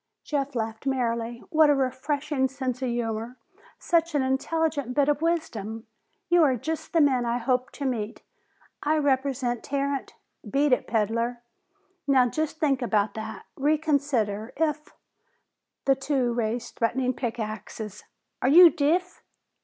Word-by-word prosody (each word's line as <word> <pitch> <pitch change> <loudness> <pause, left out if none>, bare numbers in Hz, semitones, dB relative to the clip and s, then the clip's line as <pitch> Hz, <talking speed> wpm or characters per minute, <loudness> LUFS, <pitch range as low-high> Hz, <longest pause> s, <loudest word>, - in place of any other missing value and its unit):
Jeff 280 -2 -2
laughed 225 +2 -3
merrily. 235 -3 -1
"What 315 -2 +5
a 290 - +5
refreshing 270 +1 0
sense 260 -1 -4
of 260 - 0
humor! 235 +1 -3 0.4
Such 335 -2 +1
an 280 - +2
intelligent 280 0 -1
bit 285 -1 +3
of 295 0 +1
wisdom! 225 -10 -2 0.4
You 350 0 +4
are 275 -5 +4
just 315 +6 -4
the 330 - +4
men 265 -4 +3
I 235 0 0
hoped 250 +1 -1
to 280 - -5
meet! 225 -5 -3 0.6
I 310 +2 +1
represent 265 -4 0
Tarrant 280 0 -2 0.2
" - - -15
"Beat 280 0 +3
it, 250 - +1
peddler." 230 +2 -1 0.6
"Now 260 -3 +5
just 310 +5 -2
think 275 -4 +1
about 215 -4 +1
that! 220 0 -7
Reconsider! 280 -8 0
If 305 -1 -1 0.5
" - - -55
The 275 - +5
two 270 -3 0
raised 235 0 -3
threatening 255 +2 +1
pick 240 -2 -4
axes. 215 -1 -6 0.4
"Are 255 - +3
you 340 +3 +9
deef?" 345 +4 0
265 Hz, 145 wpm, -26 LUFS, 235-290 Hz, 0.6 s, you